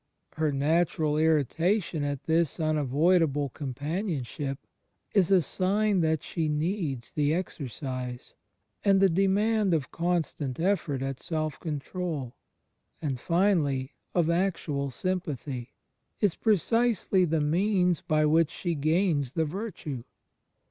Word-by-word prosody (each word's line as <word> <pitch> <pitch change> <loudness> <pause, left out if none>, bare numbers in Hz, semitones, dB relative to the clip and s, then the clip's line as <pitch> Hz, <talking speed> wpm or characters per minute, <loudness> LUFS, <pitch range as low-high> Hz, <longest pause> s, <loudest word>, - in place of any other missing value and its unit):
Her 155 -1 0
natural 155 +2 +1
irri 155 -1 +3
tation 170 - 0
at 145 -2 -2
this 165 0 +1
unavoidable 155 0 +2
companionship 145 - -3 0.6
is 190 -5 +4
a 190 -3 +5
sign 200 +4 +1
that 160 -2 +1
she 160 -2 -2
needs 150 - -2
the 150 +1 +1
exercise; 130 - -5 0.5
and 195 -1 +4
the 195 0 +5
demand 195 +2 +2
of 140 -5 -3
constant 165 -6 -1
effort 160 -7 0
at 135 -1 -3
self 155 -2 -3
control, 155 -3 -4 0.6
and 140 -5 -2
finally 155 -6 +1 0.2
of 175 -3 +3
actual 165 -5 0
sympathy, 140 -5 -4 0.4
is 205 -5 +3
precisely 220 -1 +2
the 165 -2 +1
means 180 +3 +2
by 155 -3 +2
which 160 +1 +4
she 175 +1 -3
gains 155 -3 +1
the 160 - +1
virtue. 155 - -5
160 Hz, 115 wpm, -28 LUFS, 145-185 Hz, 0.6 s, a